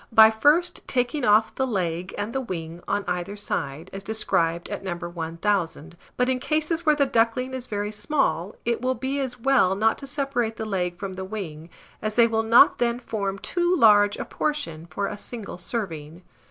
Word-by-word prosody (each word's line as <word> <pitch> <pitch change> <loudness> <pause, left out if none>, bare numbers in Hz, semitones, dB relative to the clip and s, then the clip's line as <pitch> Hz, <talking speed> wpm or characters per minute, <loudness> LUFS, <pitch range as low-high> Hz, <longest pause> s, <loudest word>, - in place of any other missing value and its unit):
by 220 -1 +8
first 310 +10 +2
taking 250 +2 0
off 215 -1 +4
the 265 - -1
leg 180 -5 -2
and 205 +3 -3
the 270 - -1
wing 170 -6 -6
on 205 - -1
either 180 +3 -2
side, 160 -6 -4
as 195 0 -6
described 170 -6 0
at - - -5
No. 185 -3 -3
1000; 170 0 -2 0.2
but 250 - +2
in 260 -1 +1
cases 315 +4 -1
where 305 - +6
the 285 -1 +3
duckling 250 0 +1
is 255 -1 -5
very 205 0 -3
small, 210 - -1
it 235 0 0
will 255 +1 0
be 265 +3 -2
as 260 -2 -2
well 235 -7 +3
not 220 +3 +2
to 275 - -8
separate 275 -5 -1
the 220 - -4
leg 180 -4 -2
from 195 -1 -5
the 190 0 -6
wing, 175 -6 -6 0.3
as 215 0 -3
they 235 - +6
will 225 -1 +1
not 225 +1 +6
then 235 -1 +1
form 200 -5 -3
too 350 - 0
large 205 - +5
a - - -4
portion 170 - -3
for 170 +5 -3
a 205 - -3
single 205 -3 -8
serving. 175 -5 -5
215 Hz, 195 wpm, -25 LUFS, 180-250 Hz, 0.3 s, by